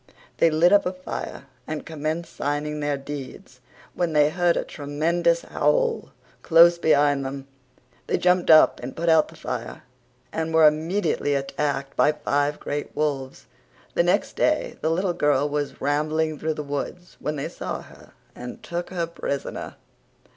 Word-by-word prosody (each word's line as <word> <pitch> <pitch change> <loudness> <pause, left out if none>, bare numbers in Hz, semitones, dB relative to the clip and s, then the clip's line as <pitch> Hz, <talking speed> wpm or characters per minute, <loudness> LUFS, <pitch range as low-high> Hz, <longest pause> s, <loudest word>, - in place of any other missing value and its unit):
They 165 - +5
lit 165 +4 +4
up 205 - +5
a 180 - -2
fire 185 -6 -6 0.2
and 155 -1 -5
commenced 160 +2 -4
sining 150 +1 -2
their 145 -1 0
deeds 135 -2 -9 0.3
when 175 -2 -1
they 150 0 +4
heard 175 0 +2
a - - 0
tremendous 165 +4 0
howl - - 0 0.3
close 170 +1 +6
behind 145 -3 +3
them. 135 0 -5 0.6
They - - +1
jumped 180 0 +2
up 155 -1 +7
and 125 +2 -7
put 170 +1 -1
out 160 -1 +5
the 165 - -15
fire 125 -6 -6 0.5
and 160 0 -2
were 160 -1 +8
immejutly 155 -2 0
attacked 140 0 -3
by 150 - +4
five 145 0 -1
great 145 0 -5
wolves. 135 - -2 0.5
The - - +3
next - - +1
day - - +1
the 160 - +1
little 175 +2 0
girl 145 -4 +2
was 145 0 -3
rambelling 155 +2 0
through 155 0 -1
the 150 - -4
woods 145 +5 -5
when 150 - -3
they 140 - -3
saw - - -5
her - - -17 0.2
and 125 0 -9
took 175 +1 -4
her 175 -2 -2
prisoner. 140 -4 -5
155 Hz, 160 wpm, -24 LUFS, 145-170 Hz, 0.6 s, were